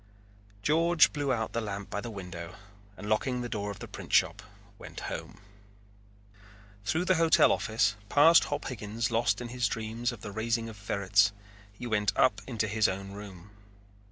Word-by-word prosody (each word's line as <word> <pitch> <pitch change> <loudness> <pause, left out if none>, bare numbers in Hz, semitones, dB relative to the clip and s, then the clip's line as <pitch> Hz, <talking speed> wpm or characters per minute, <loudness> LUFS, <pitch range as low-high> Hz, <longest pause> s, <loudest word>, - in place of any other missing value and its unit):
George 165 +3 +4
blew 145 -3 -1
out 110 -3 -1
the 115 - -1
lamp 100 -2 -5
by 105 - -2
the 120 - -6
window 90 -5 -8 0.4
and 105 - -8
locking 125 +4 0
the 120 - -3
door 105 -3 -3
of 100 - -6
the - - -8
printshop 100 +6 +1 0.4
went - - -9
home. - - -6 1.4
Through 160 - 0
the 185 -2 +3
hotel 165 -1 +5
office, 110 -1 +1
past 160 +6 +6
Hop 145 0 -3
Higgins 110 -2 -3
lost 115 -2 +1
in 120 - -6
his 125 0 0
dream 110 +1 -5
of 115 -5 -10
the 105 - -6
raising 115 +2 -1
of 110 - -9
ferrets, 100 0 +2 0.4
he 100 +5 -9
went 105 -3 +1
and - - -4
up 105 -5 +3
into 115 -4 -1
his 110 0 +2
own 95 +1 -4
room. 100 -2 -10
110 Hz, 175 wpm, -29 LUFS, 100-120 Hz, 1.4 s, past